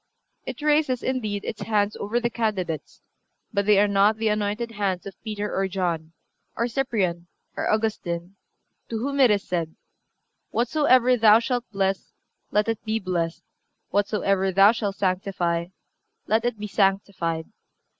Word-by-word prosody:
It 260 +2 -6
raises, 295 -4 +2
indeed, 215 -6 -2
its 215 - -5
hands 205 0 +1
over 215 +4 -1
the 235 0 -1
candidates; 190 -9 -3 0.5
but 200 -1 0
they 210 -2 +6
are 205 - +4
not 200 +2 +3
the 220 0 +1
anointed 210 +2 -1
hands 195 -4 -2
of 195 - -7
Peter 210 -2 -4
or 195 0 +1
John, 170 -4 -2 0.4
or 235 - 0
Cyprian 210 -9 -1 0.3
or - - -1
Augustine, 195 -5 -1 0.5
to 225 - -2
whom 280 +5 -2
it 260 -3 +7
is 205 -2 +2
said: 165 -3 -3 0.7
"Whatsoever 255 0 +3
thou 220 -1 +7
shalt 245 +1 -1
bless, 195 -1 -1 0.4
let 210 +1 +1
it 225 -1 -2
be 220 0 0
blessed; 175 -4 -2 0.5
whatsoever 195 -2 +1
thou 195 +3 +7
shalt 205 -4 -3
sanctify, 185 -3 -1 0.6
let 220 +3 +1
it 240 -2 -1
be 210 - -5
sanctified." 195 -5 0
205 Hz, 145 wpm, -24 LUFS, 190-225 Hz, 0.7 s, it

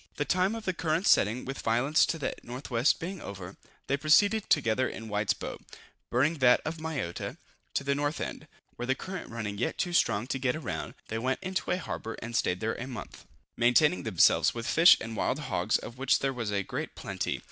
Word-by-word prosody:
The 145 - -1
time 185 +6 +1
of 225 -1 -7
the 185 - 0
current's 170 +2 +2
setting 115 +5 +3
with 135 +1 -5
violence 125 +7 +3
to 165 - -1
the 140 - -3
N.W. 120 -1 -4
being 180 +1 -6
over, 95 -1 -8 0.3
they 140 - 0
proceeded 200 +9 +3
together 115 +3 +2
in 115 0 -8
White's 105 0 +1
boat - - -7 0.5
(burning 145 +6 +1
that 125 -1 +6
of 160 +1 -3
Mayotta) 155 - -4 0.4
to - - 0
the 140 0 +1
north 145 +2 -1
end, - - -5 0.3
where 120 - -4
the 130 - +2
current 185 +4 -7
running 105 -3 -5
yet - - -1
too 180 -1 -1
strong 110 -8 +2
to 135 - -1
get 130 +3 0
round, 140 - -5
they 110 - -2
went 130 +2 0
into 185 0 -3
a 180 - +2
harbor 115 -9 -5
and 120 0 -7
staid 90 -2 +1
there 110 +1 0
a 125 - -6
month, 125 -4 -8 0.3
maintaining 135 +8 +4
themselves 105 0 +4
with 115 -1 -4
fish 165 +7 +7
and 115 0 -6
wild - - 0
hogs, - - 0
of 120 +2 -10
which 135 0 +3
there 135 0 -1
was 120 -4 -3
a 100 -1 0
great - - -5
plenty. - - -3
130 Hz, 210 wpm, -29 LUFS, 115-160 Hz, 0.5 s, fish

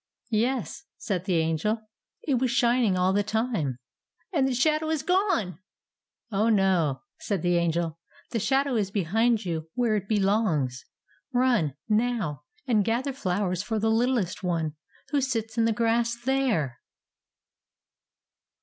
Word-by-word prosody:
"Yes," 245 +7 -1
said 185 -4 -3
the 185 -3 +1
Angel; 165 +7 +1 0.4
"it 270 -5 +1
was 255 0 +1
shining 240 -4 +2
all 185 +1 +2
the 205 - +3
time." 210 - -1 0.6
"And 275 -5 +3
the 265 - 0
shadow 310 +4 +2
is 315 -3 -1
gone!" 360 - +1 0.7
"Oh, 210 +3 +2
no!" 190 -9 +2 0.2
said 200 -6 -2
the 175 0 +2
Angel; 165 -1 0 0.3
"the 230 - 0
shadow 270 +3 +1
is 200 -3 0
behind 220 +4 +1
you, 160 -2 -3
where 240 -3 +2
it 200 -2 -2
belongs. 195 - +1 0.5
Run, 240 - +2
now, 215 - 0 0.2
and 225 -6 +3
gather 240 +6 -1
flowers 185 -6 -1
for 220 +2 -2
the 220 +1 +1
littlest 225 -5 +1
one, 165 -4 -1 0.3
who 285 -1 +1
sits 225 -4 -2
in 230 -1 +2
the 230 - +3
grass 230 +1 +1
there!" 240 - 0
215 Hz, 140 wpm, -26 LUFS, 180-245 Hz, 0.7 s, the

